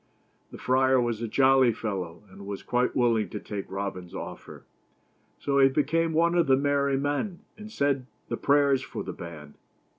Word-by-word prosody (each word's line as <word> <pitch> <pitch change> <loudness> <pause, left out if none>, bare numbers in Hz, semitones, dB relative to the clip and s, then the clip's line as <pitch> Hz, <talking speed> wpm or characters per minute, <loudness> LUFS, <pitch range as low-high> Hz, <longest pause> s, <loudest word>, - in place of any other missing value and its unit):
The - - -10
friar 130 0 +3
was 120 -2 -1
a 115 - -2
jolly 130 +1 +4
fellow, 95 -6 -5
and 100 +1 -11
was 100 -1 -6
quite 125 0 0
willing 115 -4 +2
to 105 - -5
take 100 -2 -6
Robin's 95 -3 -5
offer. - - -8 0.7
So 140 -1 0
he 135 0 +6
became 155 +4 +1
one 170 +2 +2
of 175 -3 +2
the 135 -1 +5
merry 140 -1 +1
men 145 +7 -2
and 215 0 -10
said 140 - 0 0.2
the - - -2
prayers 140 -2 +3
for - - -6
the - - -6
band. 75 -4 -10
130 Hz, 175 wpm, -27 LUFS, 105-145 Hz, 0.7 s, he